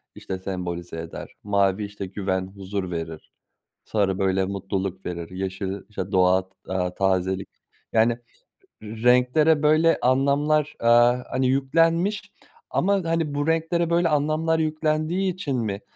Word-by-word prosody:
işte, 95 - -5
sembolize 90 -3 -5
eder. 80 0 -8
Mavi, 100 0 +1
işte, 100 -1 -7
güven, 95 -1 -2
huzur 95 -1 -5
verir. 80 -2 -6 0.5
Sarı, 100 -3 0
böyle, 95 0 +1
mutluluk 95 -1 -4
verir. 85 -2 -5
Yeşil, 95 +1 -4
işte, 105 -1 -5
doğa 95 0 +3
t 95 - -37 0.2
aaa, 90 -1 -1
tazelik 95 0 0 0.4
yani, 115 +1 +3 0.6
renklere 125 +8 +3
böyle 155 +2 +4
anlamlar, 140 +3 +2
aaa, 120 +1 +4
hani, 130 0 +1
yüklenmiş 165 +10 +1 0.4
ama, 200 +3 +2
hani, 165 -3 0
bu 145 +2 -1
renklere 165 +1 +1
böyle 170 0 +2
anlamlar 155 +2 +1
yüklendiği 155 +4 0
için 145 -7 -3
mi, 105 -3 -3
110 Hz, 130 wpm, -24 LUFS, 95-155 Hz, 0.6 s, böyle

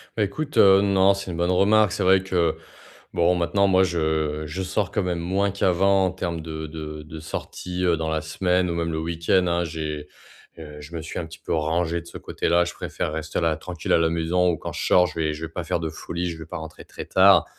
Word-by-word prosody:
Bah 110 - +1
écoute, 150 +9 -4
heu, 95 0 +7
non, 100 -1 +4
c'est 100 -1 -6
une 85 - -5
bonne 85 +1 +1
remarque, 105 +2 +4
c'est 105 -2 -1
vrai 95 0 +4
que, 90 -3 0 0.6
bon 85 +1 +3
maintenant 100 +3 +2
moi, 95 0 +4
je 80 -3 0
je 85 +5 -4
sors 95 +1 -1
quand - - 0
même 90 -2 -2
moins 95 +3 0
qu'avant 95 0 +3
en 90 - 0
termes 85 -3 -4
de 80 0 -6
de 75 -1 -7
de 80 +1 -9
sortie, 90 +3 -5
heu, 85 -2 +3
dans 80 0 -2
la 80 -1 -1
semaine 90 +3 0
ou - - -1
même 85 0 -2
le 80 - -2
week-end. 85 +3 +1
Hein, 85 0 +1
j'ai, 75 -2 -5 0.5
heu, 75 -2 -10
je 80 +4 -10
me 80 - -4
suis 80 - -6
un 85 - -4
petit 80 0 -12
peu - - -4
rangé 80 +2 0
de - - -18
ce - - -9
côté-là. 85 +1 +1
Je 85 - -5
préfère - - -4
rester 80 0 -3
là, 80 -2 +2
tranquille 85 -1 -3
à - - +6
la 80 0 +2
maison 85 +2 +1
ou 80 - 0
quand - - -6
je - - -3
sors, 90 0 +5
je 85 -2 -7
vais 75 -1 0
je 80 +2 -5
vais 80 - -10
pas 90 0 -4
faire 85 - -1
de 80 - -3
folies, 85 +3 -4
je 85 - -6
vais 80 - -8
pas - - -6
rentrer 80 -1 -9
très - - -8
tard. 95 -3 +5
85 Hz, 250 wpm, -24 LUFS, 80-95 Hz, 0.6 s, heu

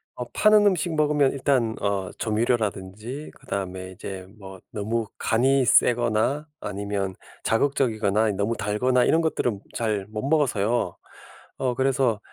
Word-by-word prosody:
어 125 - -4
파는 215 -1 +5
음식 175 -4 +1
먹으면 150 -2 +3
일단 130 -5 +1
어 100 -2 -1
조미료라든지 110 +3 -2
그다음에 95 -7 -5
이제 95 0 -8
뭐 95 -2 -10
너무 110 +2 -2
간이 130 +3 +2
세거나 120 +5 +3
아니면 100 -1 -3 0.3
자극적이거나 110 -4 +1
이 105 - 0
너무 100 +4 -1
달거나 125 +5 +1
이런 165 - +3
것들은 120 -10 -1
잘 105 -4 -1
못 110 +4 -4
먹어서요. 120 - +1 0.6
어 125 -2 0
그래서 130 -4 +1
115 Hz, 295 characters per minute, -25 LUFS, 100-135 Hz, 0.6 s, 파는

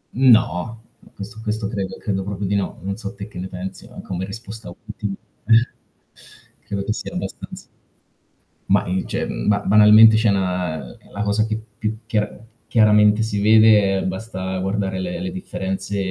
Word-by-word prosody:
No, 115 -4 +3 0.3
questo 105 +2 -9
questo 105 -1 -2
credo 100 -3 -4
credo 95 -2 -2
proprio 100 0 -4
di 100 - -1
no. 100 - -2
Non 100 +1 -3
so 100 -3 -6
te 100 +1 -7
che 90 - -10
ne 95 - -4
pensi, 95 +1 -8
ma - - -11
come 95 0 -4
risposta 110 +1 -9
obiettiva 105 +1 -6 0.3
ehm 115 +2 +6 1.0
credo 100 -1 -3
che 105 - -1
sia - - -7
abbastanz - - -7 1.0
Mah - - +3
i 95 +1 -1
cioè - - -3
ba 105 -1 0
banalmente 105 +2 +7
c'è 110 -1 +3
'na 90 -4 -1 0.3
la 100 - -5
cosa 105 +1 +1
che 110 -1 -2
più 110 -1 -14 0.2
più 110 - -9
chia 105 -2 -2 0.3
chiaramente 105 -1 +4
si 105 -2 -1
vede 105 -2 +5
è - - -3
basta 95 -1 -4
guardare 95 0 -2
le 170 - -4
le 180 -1 -4
differenze, 100 - -4
105 Hz, 170 wpm, -21 LUFS, 95-110 Hz, 1.0 s, banalmente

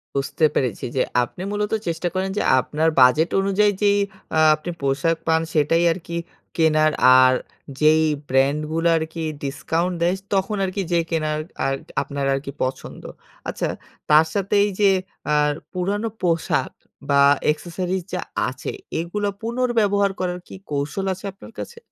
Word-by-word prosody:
বুঝতে 140 +3 0
পেরেছি 125 -7 -1
যে, - - +2 0.2
আপনি 125 +9 -6
মূলত 210 0 -2
চেষ্টা 170 +1 -1
করেন 190 +1 -1
যে, - - +1 0.2
আপনার 155 +5 0
বাজেট 150 +6 +5
অনুযায়ী 200 +2 +2
যেই 205 0 +4 0.4
আ - - +5
আপনি 155 +3 -5
পোশাক 140 +4 +1
পান 160 0 +3
সেটাই 165 +3 +2
আর 185 - -5
কি 170 - -5 0.4
কেনার 155 -1 +3 0.3
আর 130 0 +5 0.5
যেই 155 +1 +5 0.2
ব্র্যান্ডগুলো 150 +5 +1
আর 160 - 0
কি 165 - -5 0.2
ডিসকাউন্ট 165 +6 -1
দেয় 175 +2 +2 0.2
তখন 195 +2 0
আর 190 - -1
কি 200 - 0
যেয়ে 170 -1 +2
কেনার 155 -2 -1 0.3
আর 135 - +1 0.3
আপনার 140 0 -3
আর - - 0
কি 140 - -5
পছন্দ। 130 +1 -4 0.5
আচ্ছা - - -2 0.4
তার 155 +2 +7
সাথে 200 0 -1
এই 205 - 0
যে 200 - +6 0.4
আ - - +4 0.4
পুরানো 200 +4 -1
পোশাক 165 -2 0 0.4
বা 140 0 +5 0.3
accessories 180 +3 -4
যা - - -1 0.3
আছে - - -5 0.3
এগুলো 205 +5 -2
পুনর্ব্যবহার 225 -4 +1
করার 180 -1 -2
কি - - -10 0.2
কৌশল 145 +7 -2
আছে 190 +2 -9
আপনার 195 - -14
কাছে? - - -7
165 Hz, 155 wpm, -22 LUFS, 150-195 Hz, 0.5 s, তার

